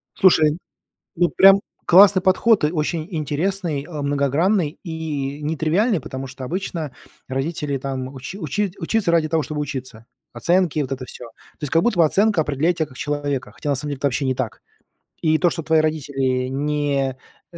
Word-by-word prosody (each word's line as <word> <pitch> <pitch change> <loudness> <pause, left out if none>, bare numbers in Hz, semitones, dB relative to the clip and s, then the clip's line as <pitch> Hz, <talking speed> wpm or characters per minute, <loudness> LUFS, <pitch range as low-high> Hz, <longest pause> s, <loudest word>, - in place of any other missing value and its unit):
Слушай, 160 -4 +4 0.6
ну 175 0 +3
прям 195 +1 +7 0.3
классный 190 +1 +7
подход, 190 0 +3
э, - - +4
очень 155 0 -2
интересный, 160 0 -2
а, 150 -4 -5
многогранный 145 +5 +1
и 150 -4 -4
нетривиальный, 160 +7 +1
потому 130 0 -6
что 130 0 -8
обычно 165 -2 -4 0.4
родители 140 +1 -2
там 130 -1 -4
учи 135 +9 -7
учи 190 +4 -2
учится 225 -6 0
ради 165 -2 +2
того, 160 -1 +1
чтобы 150 -1 -4
учиться. 130 -5 -6 0.3
Оценки, 175 -3 +1
вот 135 -2 -2
это 130 -1 -4
всё. 125 - -10 0.3
То - - -29
есть, 145 - -5
как 165 +1 +4
будто 175 -9 +3
оценка 200 +1 +3
определяет 155 +5 0
тебя 160 - 0
как 130 -3 -16
человека, 145 -2 -3
хотя 145 - -4
на - - +2
самом 150 +2 -4
деле 140 - -3
это 140 - 0
вообще 135 +1 0
не 130 - +1
так. 120 -3 -4 0.6
И 160 -1 +3
то, 175 0 +3
что 165 -2 -5
твои 160 0 +3
родители 135 -5 -1
не, 140 -1 -1 0.3
э, - - -11
150 Hz, 180 wpm, -21 LUFS, 140-170 Hz, 0.6 s, прям